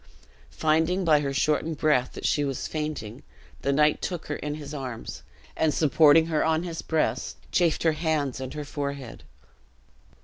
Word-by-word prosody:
Finding, 160 Hz, +4 st, +1 dB
by 155 Hz, -2 st, +5 dB
her 140 Hz, -1 st, -2 dB
shortened 150 Hz, +3 st, 0 dB
breath, 140 Hz, -5 st, +2 dB
that -, -, -7 dB
she 145 Hz, -, +2 dB
was 135 Hz, -2 st, -3 dB
fainting, 150 Hz, -6 st, -4 dB, 0.4 s
the 140 Hz, -, +1 dB
knight 150 Hz, +2 st, +3 dB
took 175 Hz, -3 st, -4 dB
her 145 Hz, -, -3 dB
in 150 Hz, 0 st, -4 dB
his 150 Hz, -1 st, -8 dB
arms, 130 Hz, -5 st, -6 dB, 0.3 s
and 155 Hz, -2 st, +1 dB
supporting 155 Hz, +1 st, +5 dB
her 160 Hz, -2 st, 0 dB
on 160 Hz, +1 st, +1 dB
his 170 Hz, -2 st, -5 dB
breast, 160 Hz, -1 st, -1 dB
chafed 170 Hz, -3 st, +2 dB
her 165 Hz, -, +4 dB
hands 155 Hz, -4 st, -1 dB
and 130 Hz, +1 st, -6 dB
her 150 Hz, -1 st, -5 dB
forehead. 140 Hz, -4 st, -5 dB
150 Hz, 165 wpm, -26 LUFS, 140-160 Hz, 0.4 s, by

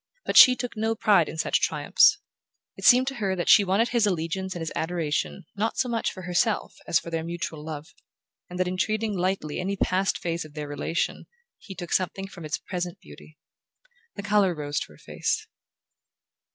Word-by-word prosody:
But -, -, -2 dB
she 255 Hz, -2 st, +10 dB
took 245 Hz, -1 st, -5 dB
no 220 Hz, +1 st, 0 dB
pride 200 Hz, -7 st, +3 dB
in -, -, -7 dB
such 155 Hz, -, +1 dB
triumphs. -, -, +4 dB, 0.6 s
It -, -, -7 dB
seemed 255 Hz, +1 st, +7 dB
to 270 Hz, -, -8 dB
her 190 Hz, -2 st, 0 dB
that 175 Hz, -, -3 dB
she 205 Hz, -, +8 dB
wanted 200 Hz, +5 st, +1 dB
his 235 Hz, -4 st, +2 dB
allegiance 185 Hz, +1 st, -2 dB
and -, -, -4 dB
his 165 Hz, -, -4 dB
adoration 160 Hz, -, -2 dB
not 215 Hz, +3 st, -1 dB
so 255 Hz, -, +1 dB
much 230 Hz, -2 st, -1 dB
for 185 Hz, -, -10 dB
herself 180 Hz, +5 st, 0 dB
as -, -, +3 dB
for 170 Hz, -, -5 dB
their 165 Hz, -1 st, -2 dB
mutual 170 Hz, -2 st, -5 dB
love, 155 Hz, +1 st, -7 dB, 0.6 s
and 180 Hz, -, -7 dB
that 185 Hz, 0 st, 0 dB
in 185 Hz, +1 st, -3 dB
treating 215 Hz, +1 st, -1 dB
lightly 180 Hz, -4 st, -2 dB
any 195 Hz, +2 st, -2 dB
past 190 Hz, 0 st, +1 dB
phase 170 Hz, 0 st, -3 dB
of 155 Hz, -1 st, -14 dB
their 150 Hz, -1 st, -5 dB
relation 145 Hz, +3 st, -3 dB, 0.3 s
he 195 Hz, -, -10 dB
took 175 Hz, -2 st, -5 dB
something 190 Hz, +1 st, -1 dB
from 175 Hz, -4 st, -10 dB
its 155 Hz, -, -2 dB
present 175 Hz, -2 st, -5 dB
beauty. 155 Hz, -, -15 dB, 0.8 s
The 200 Hz, -, -6 dB
colour 205 Hz, -3 st, +2 dB
rose 145 Hz, -1 st, -2 dB
to -, -, -7 dB
her -, -, -18 dB
face. -, -, -2 dB
180 Hz, 195 wpm, -26 LUFS, 165-205 Hz, 0.8 s, she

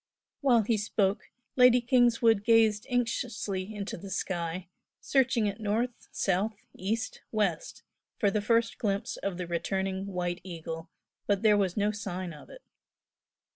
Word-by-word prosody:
While 245 Hz, -6 st, +4 dB
he 220 Hz, +1 st, +1 dB
spoke 205 Hz, -1 st, 0 dB, 0.3 s
Lady 250 Hz, -1 st, +7 dB
Kingswood 235 Hz, -3 st, +3 dB
gazed 220 Hz, -2 st, +4 dB
anxiously 220 Hz, -5 st, -1 dB
into 200 Hz, -1 st, -4 dB
the 195 Hz, +3 st, -9 dB
sky, 175 Hz, -2 st, -3 dB, 0.3 s
searching 260 Hz, -4 st, +2 dB
it 205 Hz, +1 st, -2 dB
north, 225 Hz, +3 st, -2 dB
south, 200 Hz, +3 st, -1 dB
east, 220 Hz, +5 st, -3 dB
west, 200 Hz, -7 st, -1 dB, 0.3 s
for 205 Hz, -4 st, +2 dB
the 210 Hz, -, 0 dB
first 230 Hz, +2 st, +1 dB
glimpse 200 Hz, -2 st, -1 dB
of 195 Hz, -3 st, -3 dB
the 180 Hz, -, -3 dB
returning 190 Hz, +3 st, -2 dB
"White 180 Hz, -2 st, -3 dB
Eagle," 165 Hz, -2 st, -7 dB, 0.4 s
but 200 Hz, 0 st, +1 dB
there 215 Hz, -1 st, +6 dB
was 195 Hz, -2 st, 0 dB
no 205 Hz, 0 st, +2 dB
sign 185 Hz, -4 st, -5 dB
of 150 Hz, -, -13 dB
it. -, -, -13 dB
205 Hz, 140 wpm, -29 LUFS, 190-225 Hz, 0.4 s, Lady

